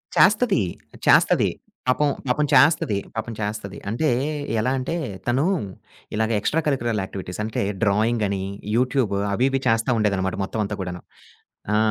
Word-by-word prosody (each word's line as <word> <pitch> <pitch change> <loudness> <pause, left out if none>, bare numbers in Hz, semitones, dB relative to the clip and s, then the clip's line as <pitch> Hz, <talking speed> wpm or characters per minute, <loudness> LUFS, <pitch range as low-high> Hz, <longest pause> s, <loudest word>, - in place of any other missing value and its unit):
చేస్తది 210 - +4 0.5
చేస్తది. - - +5 0.4
పాపం 145 +3 +3 0.2
పాపం 135 +4 +2
చేస్తది. 140 -6 +4 0.2
పాపం 115 +1 -3
చేస్తది. 105 -1 -4
అంటే 120 +9 +1 0.5
ఎలా 120 +4 +1
అంటే 135 +6 -3 0.3
తను 130 +5 +2 0.7
ఇలాగ 110 +1 0
ఎక్స్ట్రా 160 +9 +1
కలికురల్ 120 -7 0
యాక్టివిటీస్ 95 0 -6
అంటే 110 - -2 0.2
డ్రాయింగ్ 110 +2 +2
అని, 95 -1 -2 0.3
యూట్యూబ్ 125 -3 +1 0.2
అవి 125 +6 +2
ఇవి 135 0 0
చేస్తా 115 +1 +2
ఉండేదనమాట 95 -3 0
మొత్తం 110 - -3
అంతా 100 0 -4
కూడాను. 90 -1 -5 0.7
ఆ! - - +4
115 Hz, 135 wpm, -23 LUFS, 105-130 Hz, 0.7 s, చేస్తది